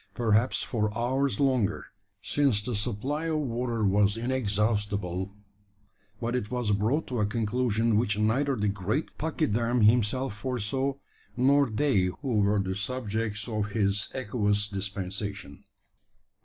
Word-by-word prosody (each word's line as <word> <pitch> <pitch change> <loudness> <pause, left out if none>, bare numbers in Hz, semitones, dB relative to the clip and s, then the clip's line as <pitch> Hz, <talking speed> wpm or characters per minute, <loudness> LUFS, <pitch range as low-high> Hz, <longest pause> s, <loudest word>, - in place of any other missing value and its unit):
Perhaps 115 +1 +2
for 105 -3 -1
hours 130 +4 0
longer 125 -8 +1 0.4
since 135 -8 +1
the 120 0 -3
supply 125 +9 -2
of 160 -1 0
water 120 -5 -1
was 100 +2 +3
inexhaustible; 105 -6 -1 0.9
but 120 +1 -2
it 110 -4 -2
was 125 -4 -1
brought 110 +10 +1
to 125 -3 -3
a 105 - +3
conclusion 115 0 +1
which 110 -2 +1
neither 130 +6 +2
the 105 -2 0
great 100 - -2
pachyderm 125 -6 0
himself 115 +2 +3
foresaw, 130 +4 -1 0.4
nor 140 +1 +4
they 110 -4 +2 0.2
who 125 -7 0
were 100 +1 +3
the 95 -1 -1
subjects 105 0 -2
of 110 -3 -2
his 100 -1 +1
aqueous 105 -4 0
dispensation. 100 -3 -5
110 Hz, 130 wpm, -28 LUFS, 105-125 Hz, 0.9 s, nor